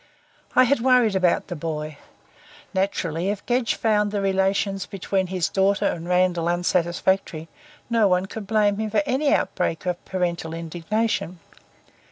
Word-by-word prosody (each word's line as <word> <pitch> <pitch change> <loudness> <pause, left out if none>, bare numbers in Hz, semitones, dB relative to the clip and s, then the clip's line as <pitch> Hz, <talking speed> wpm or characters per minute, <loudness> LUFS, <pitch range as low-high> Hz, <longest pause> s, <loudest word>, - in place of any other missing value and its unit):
I 255 - +7
had 270 +2 +2
worried 245 -4 +3
about 185 -2 +2
the 175 - -6
boy. 155 -2 -5 0.7
Naturally, 185 -2 -1
if 205 -1 -4
Gedge 245 -1 +1
found 210 -2 +1
the 205 0 -2
relations 195 0 0
between 195 -1 -2
his 185 -2 -1
daughter 195 +1 +1
and 170 +1 -2
Randall 180 -2 +2
unsatisfactory, 175 -1 0 0.4
no 230 -3 +3
one 180 0 +2
could 200 +1 -8
blame 210 -1 +2
him 220 0 -2
for 210 -1 +1
any 280 +3 +1
outbreak 165 - 0
of 180 -1 -2
parental 170 -3 -2
indignation. 175 +3 -2
190 Hz, 145 wpm, -23 LUFS, 175-210 Hz, 0.7 s, I